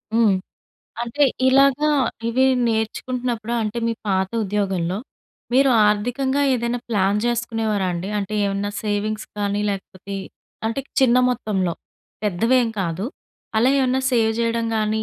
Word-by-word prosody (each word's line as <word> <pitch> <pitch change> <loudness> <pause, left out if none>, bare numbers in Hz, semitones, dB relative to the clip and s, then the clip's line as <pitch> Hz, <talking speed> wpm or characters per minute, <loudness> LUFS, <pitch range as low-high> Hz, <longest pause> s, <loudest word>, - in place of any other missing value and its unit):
హ్మ్. 225 -4 +5 0.7
అంటే 260 +5 +1 0.2
ఇలాగా, 275 +3 +4 0.4
ఇవి 260 +3 +2 0.2
నేర్చుకుంటున్నప్పుడు, 235 +1 -2
అంటే 215 +2 -2
మీ 230 - +1 0.2
పాత 190 0 +1 0.2
ఉద్యోగంలో, 190 -2 -1 0.5
మీరు 270 +1 +5 0.2
ఆర్థికంగా 245 +7 +1
ఏదైనా 235 0 -1
ప్లాన్ 200 -1 +2
చేసుకునేవారా 225 -4 0
అండి? 175 +3 -4
అంటే 205 +1 -3
ఏమన్నా 200 +1 -1
సేవింగ్స్ 210 0 -2
కానీ, 205 0 0
లేకపోతే 195 0 -6 0.5
అంటే 230 +5 -1 0.2
చిన్న 250 -2 +5
మొత్తంలో, 195 -7 -1 0.5
పెద్దవేం 230 +5 +2
కాదు. 175 +2 -2 0.5
అలా 250 +4 +4
ఏమన్నా 260 0 +2
సేవ్ 225 -2 +3
జేయడం 230 0 0
గాని, 215 0 0
220 Hz, 120 wpm, -22 LUFS, 200-245 Hz, 0.7 s, హ్మ్